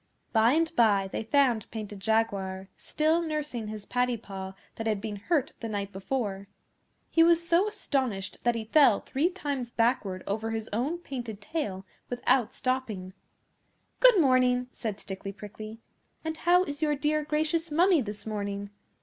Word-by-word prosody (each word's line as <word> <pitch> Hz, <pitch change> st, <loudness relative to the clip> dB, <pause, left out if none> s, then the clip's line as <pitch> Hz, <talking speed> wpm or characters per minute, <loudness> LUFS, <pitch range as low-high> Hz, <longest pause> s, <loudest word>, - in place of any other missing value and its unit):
By 225 Hz, +2 st, +5 dB
and 330 Hz, +1 st, +1 dB
by 200 Hz, -4 st, +4 dB
they -, -, -2 dB
found 245 Hz, -3 st, +2 dB
Painted 210 Hz, -2 st, -6 dB
Jaguar, 195 Hz, -3 st, 0 dB
still 315 Hz, +2 st, +1 dB
nursing 300 Hz, -8 st, -3 dB
his 210 Hz, -1 st, -6 dB
paddy 245 Hz, 0 st, 0 dB
paw 190 Hz, -3 st, -7 dB, 0.2 s
that 225 Hz, -, -3 dB
had 215 Hz, -2 st, +1 dB
been 210 Hz, 0 st, -5 dB
hurt 290 Hz, -, 0 dB
the 230 Hz, -, -5 dB
night 200 Hz, -2 st, -3 dB
before. 200 Hz, -1 st, -3 dB, 0.6 s
He 330 Hz, -, +4 dB
was 335 Hz, 0 st, +5 dB
so 345 Hz, +4 st, +4 dB
astonished 265 Hz, -, -2 dB
that 240 Hz, -1 st, +2 dB
he 225 Hz, -1 st, -3 dB
fell 240 Hz, -3 st, +5 dB
three 295 Hz, +6 st, 0 dB
times 285 Hz, -9 st, -3 dB
backward 230 Hz, -6 st, 0 dB
over 220 Hz, +3 st, -2 dB
his 225 Hz, -1 st, -3 dB
own 270 Hz, +10 st, 0 dB
painted 240 Hz, -, -6 dB
tail 200 Hz, -, -4 dB, 0.2 s
without 245 Hz, -1 st, +2 dB
stopping. 225 Hz, -8 st, -2 dB, 0.9 s
'Good -, -, +7 dB
morning!' 255 Hz, -3 st, +3 dB
said 215 Hz, -5 st, -5 dB
Stickly 195 Hz, +1 st, -6 dB
Prickly. 215 Hz, +2 st, -9 dB, 0.5 s
'And 320 Hz, 0 st, -2 dB
how 350 Hz, +3 st, +4 dB
is 290 Hz, -3 st, -4 dB
your 300 Hz, -1 st, +2 dB
dear 300 Hz, +1 st, 0 dB
gracious 315 Hz, +2 st, 0 dB
Mummy 340 Hz, +1 st, +4 dB
this 210 Hz, -2 st, -5 dB
morning? 200 Hz, -1 st, -4 dB
240 Hz, 160 wpm, -28 LUFS, 205-300 Hz, 0.9 s, Good